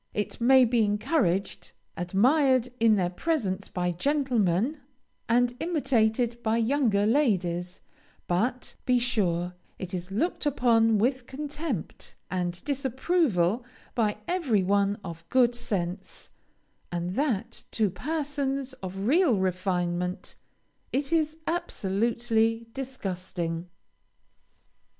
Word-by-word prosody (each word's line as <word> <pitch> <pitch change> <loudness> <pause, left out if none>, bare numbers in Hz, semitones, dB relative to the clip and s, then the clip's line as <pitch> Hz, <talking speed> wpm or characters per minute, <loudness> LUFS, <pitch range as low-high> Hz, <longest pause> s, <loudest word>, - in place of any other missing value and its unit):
It 210 +2 -3
may 260 +1 +7
be 235 -1 +2
encouraged, 205 - 0 0.2
admired, 255 - +3
in 225 -1 +5
their 180 -3 0
presence, 205 - -1
by 180 -1 -1
gentlemen, 245 - +1 0.5
and 245 +1 +3
imitated 240 -7 +1
by 225 0 +1
younger 230 -4 +2
ladies, 185 - +1 0.4
but, 235 +8 -1
be 250 -1 +4
sure, 180 -8 0 0.2
it 185 0 -6
is 180 0 -4
looked 295 - -1
upon 230 -5 +3
with 250 +3 0
contempt, 295 - -5 0.2
and 180 -1 -2
disapproval 265 - +1 0.3
by 215 -4 +1
every 280 - +1
one 200 +1 +2
of 165 -2 -9
good 245 -2 +4
sense, 190 -5 -3 0.6
and 175 0 -2
that 235 -3 -1
to 215 -4 0
persons 280 - -2
of 190 +1 -5
real 290 - +4
refinement 180 -1 -1 0.6
it 275 +4 -1
is 315 -1 +1
absolutely 225 - 0
disgusting. 180 -9 -4
225 Hz, 105 wpm, -27 LUFS, 185-265 Hz, 0.6 s, may